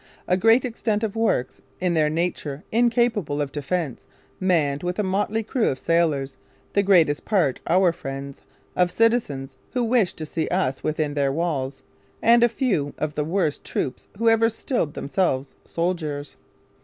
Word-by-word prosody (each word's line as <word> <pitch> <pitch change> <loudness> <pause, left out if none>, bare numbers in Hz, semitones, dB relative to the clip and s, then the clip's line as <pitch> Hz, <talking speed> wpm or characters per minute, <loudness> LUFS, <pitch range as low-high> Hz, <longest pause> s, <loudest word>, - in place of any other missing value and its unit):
A 180 - +3
great 225 +7 +4
extent 225 -3 -1
of 220 -1 -2
works, 225 - 0 0.2
in 180 -1 +1
their 155 -2 +3
nature 160 -2 -2
incapable 230 -9 +2
of 145 -2 -2
defence, 145 0 -3 0.3
manned 160 -6 +1
with 180 0 -3
a 210 - +1
motley 205 +3 0
crew 225 +2 0
of 130 - -2
sailors, 150 -5 0 0.4
the 200 - +4
greatest 175 -7 +3
part 175 - +1
our 180 0 +4
friends; 135 -3 -7 0.3
of 180 -1 +3
citizens, 150 - 0 0.2
who 250 -1 +1
wish 230 -5 +2
to 155 - -6
see 160 +1 -2
us 155 -8 -1
within 155 -1 -1
their 140 -2 +1
walls, 140 -4 -2 0.2
& - - -26
a 235 +1 +6
few 200 - -1
of 155 -1 -2
the 150 - -1
worst 160 -1 -1
troops 130 - -3
who 230 +2 0
ever 225 0 +5
stiled 225 - -2
themselves 140 -4 -1
Soldiers. 160 -4 -3
170 Hz, 160 wpm, -24 LUFS, 145-215 Hz, 0.4 s, a